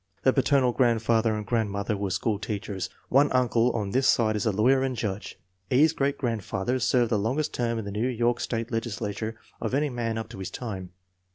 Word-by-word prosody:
The 130 - +4
paternal 135 -2 +3
grandfather 115 -2 +2
and 105 -1 -4
grandmother 105 -2 -1
were 100 -1 -2
school 105 +2 -1
teachers. 105 -2 -4 0.2
One 140 +3 +4
uncle 125 -2 +3
on 105 -4 -2
this 130 +3 +2
side 110 -2 +3
is 105 +2 -1
a - - +3
lawyer 125 +7 +3
and 130 -1 -1
judge. 105 -2 -4 0.3
E.'s 150 +5 +4
great 140 -1 0
grandfather 115 -1 -1
served 120 -2 +2
the 110 - +2
longest 135 +9 -1
term 115 -1 -1
in 110 - -4
the 100 - -5
New 110 +5 0
York 120 -1 +1
state 115 0 -2
legisla 115 -3 -3
ture 110 +1 -4 0.3
of 115 +3 -1
any 145 0 +1
man 115 -2 -2
up 110 - -4
to - - -9
his 95 - -4
time. 95 -7 -6
115 Hz, 205 wpm, -27 LUFS, 105-125 Hz, 0.3 s, The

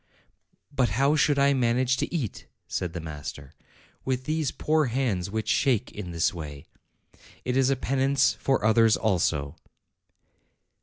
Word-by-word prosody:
"But 130 -5 +1
how 140 +3 +3
should 145 -1 +3
I 140 0 +4
manage 125 0 +2
to - - -2
eat," 140 - -4 0.2
said 90 -2 -3
the 85 - -4
master, 75 -3 -8 0.5
"with 130 -1 -2
these 155 0 -1
poor 155 0 +1
hands 115 -8 -1
which 110 +2 -3
shake 125 -4 +1
in 105 -4 -7
this 85 -1 0
way? 75 -4 -8 0.8
It 125 - -1
is 135 0 +3
a 135 - +2
penance 135 +1 +1
for 135 -6 0
others 110 0 +4
also." 80 -9 0
125 Hz, 145 wpm, -26 LUFS, 90-135 Hz, 0.8 s, I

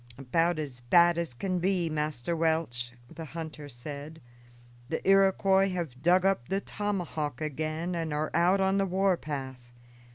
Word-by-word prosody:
"About 165 +6 +1
as 140 -5 -5
bad 170 +7 +5
as 165 -8 -4
can 185 +6 -1
be, 180 -1 +1
Master 155 0 -2
Welch," 160 -8 0
the 165 - -9
hunter 155 -2 -6
said. 145 +5 -8 0.7
"The 160 - -3
Iroquois 195 0 +4
have 165 -9 -4
dug 180 +3 +4
up 195 -11 +1
the 195 - +1
tomahawk 175 -10 -3
again 155 +3 -3
and 165 -2 -2
are 150 +1 -1
out 175 +4 +3
on 195 +1 +2
the 195 - +1
war 190 +1 +2
path. 130 -6 -6
165 Hz, 155 wpm, -29 LUFS, 145-185 Hz, 0.7 s, bad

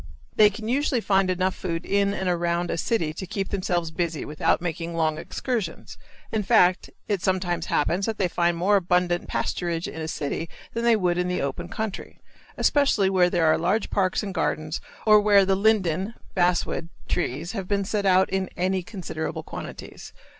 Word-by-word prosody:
They 210 -1 +7
can 215 +2 -7
usually 265 +1 +1
find 195 -3 +2
enough 185 +1 +1
food 165 -2 -4
in 200 0 +2
and 190 -2 -3
around 175 0 0
a - - -2
city 165 -6 0
to 190 +4 -7
keep 195 +1 -3
themselves 175 -4 -1
busy 165 -2 -2
without 150 +1 +1
making 170 0 -4
long 155 -2 0
excursions; 215 -1 -4 0.4
in 220 - 0
fact, 185 -4 +3 0.2
it 200 -4 0
sometimes 180 -3 -1
happens 180 +7 +1
that 220 -1 -2
they 190 - +1
find 170 0 +1
more 200 +4 +3
abundant 180 -1 +1
pasturage 170 -1 -2
in 160 - -6
a 160 - -3
city 160 +1 -3 0.2
than 230 - -2
they 235 -1 +5
would 180 -4 +1
in 180 - 0
the 180 0 -1
open 140 -1 -4
country, 220 -3 -5 0.4
especially 250 -10 +3
where 180 -2 +4
there 175 -2 +1
are 155 - +4
large 190 +6 0
parks 190 0 +1
and 195 -2 -4
gardens 155 -2 -2 0.2
or 215 -1 +7
where 205 -2 +5
the 195 0 +2
linden 195 -1 +1 0.2
(basswood) 175 -2 +1 0.2
trees 165 +1 -2
have 195 -5 -5
been 200 0 0
set 205 0 -1
out 190 0 +5
in 190 -1 -1
any 185 +1 0
considerable 175 -4 -5
quantities. - - -9
185 Hz, 180 wpm, -25 LUFS, 170-200 Hz, 0.4 s, They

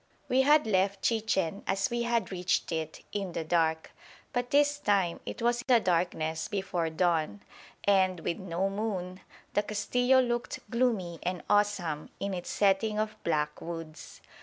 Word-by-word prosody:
We 260 +1 +3
had 300 +3 +5
left 195 -1 +1
Chichen, 210 -5 0
as 195 +2 0
we 240 0 0
had 235 -5 0
reached 180 -1 0
it, 160 -1 -3
in 195 -4 -3
the 165 - -2
dark. 160 -1 +1 0.4
But 245 -1 -1
this 290 0 +3
time 195 -9 +1
it - - -5
was 240 0 +2
the 245 -3 +6
darkness 165 -4 0
before 185 -4 -2
dawn, 160 - 0 0.4
and, 190 -3 +3
with 170 - -2
no 185 +1 -1
moon, 195 -3 -3 0.3
the 205 - +3
Castillo 245 +5 +2
looked 240 -1 -1
gloomy 220 -9 0
and 180 0 -3
awesome 195 -7 +1
in 200 0 -2
its 175 -1 -5
setting 210 +2 +2
of 215 0 -1
black 150 -2 -1
woods. 165 -2 -8
195 Hz, 155 wpm, -29 LUFS, 170-225 Hz, 0.4 s, the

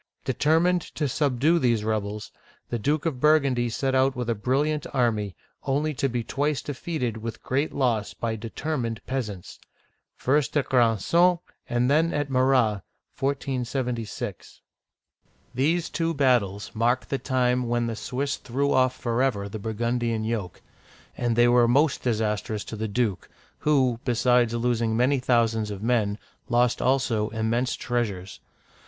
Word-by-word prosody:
Determined 170 +4 +2
to 150 - 0
subdue 145 +4 +2
these 120 -6 +1
rebels, 105 -1 -3 0.4
the 120 - -1
Duke 145 +7 0
of 150 -6 -1
Burgundy 140 -5 +3
set 135 +3 -1
out 130 0 +3
with 120 -1 -2
a - - +2
brilliant 140 +7 0
army, 110 -7 0 0.3
only 145 +3 0
to 135 0 -1
be 120 -1 -2
twice 145 +3 -1
defeated 135 -5 -3
with 110 0 -7
great 140 +4 0
loss 115 -6 0
by 115 -1 -2
determined 115 +1 -3
peas 130 -4 -2
ants 95 -4 -10 0.6
(first 145 +2 +1
at 145 - +1
Granson 130 - +3 0.3
and 120 +1 +1
then 160 +4 +2
at 145 -2 -2
Morat, 130 -6 +2 0.4
1476). 125 -4 -3 0.9
These 160 +7 +1
two 165 -1 -1
battles 120 -8 +1
mark 120 +3 +1
the 135 - -2
time 125 -2 +1
when 120 0 0
the 115 -1 -3
Swiss 140 +5 -3
threw 140 +3 -1
off 130 0 +3
forever 120 -4 0
the 110 +2 -6
Burgundian 115 +1 -1
yoke; 110 -5 -4 0.5
and 120 -2 0
they 120 +1 +5
were 120 0 +5
most 140 +5 +3
dis 115 -4 0
astrous 105 0 -2
to - - -6
the 110 +1 -3
duke, 105 -4 -1 0.3
who, 130 -6 +2
besides 120 -1 +2
losing 115 -1 0
many 130 +3 +3
thousands 115 -3 +1
of 100 0 -6
men, 110 -4 +1 0.3
lost 120 0 +2
also 125 -5 +1
immense 115 +3 -1
treasures. 105 -7 -3
125 Hz, 145 wpm, -25 LUFS, 115-135 Hz, 0.9 s, they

